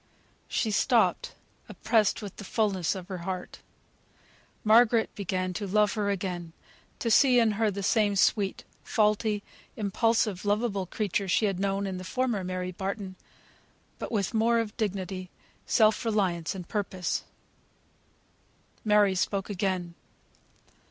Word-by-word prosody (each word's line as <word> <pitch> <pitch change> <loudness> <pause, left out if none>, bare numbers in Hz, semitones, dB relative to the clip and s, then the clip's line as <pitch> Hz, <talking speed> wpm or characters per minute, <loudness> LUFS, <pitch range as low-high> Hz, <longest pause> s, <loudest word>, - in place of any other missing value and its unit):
She 220 - -1
stopped, 200 - +2 0.3
oppressed 220 -2 +1
with 200 - -8
the - - -7
fulness 195 -4 0
of 185 -2 -7
her 185 -2 -5
heart. 180 +1 -5 1.0
Margaret 225 +1 +4
began 185 -2 -2
to 205 +2 -4
love 210 +2 +2
her 210 -2 -1
again; 180 -4 -3 0.4
to 230 - -1
see 255 +2 +6
in 225 -2 +3
her 215 +1 +1
the 200 0 -4
same 205 +1 +2
sweet, 195 0 +1 0.2
faulty, 210 -1 +1 0.3
impulsive, 215 -2 +1
lovable 205 -2 0
creature 200 0 -2
she 200 +4 +2
had 195 -3 -1
known 195 0 0
in 190 -2 -4
the - - -7
former 240 -1 -1
Mary 185 0 -3
Barton, 190 +1 -5 0.8
but - - -5
with 205 -3 -1
more 230 +1 +3
of 225 -2 -2
dignity, 190 -4 -3 0.4
self 215 -2 +3
reliance, 195 -6 0
and 180 -3 -7
purpose. 190 -4 -2 1.6
Mary 210 -2 +4
spoke 195 +2 -1
again. 185 -3 -2
200 Hz, 130 wpm, -28 LUFS, 185-215 Hz, 1.6 s, see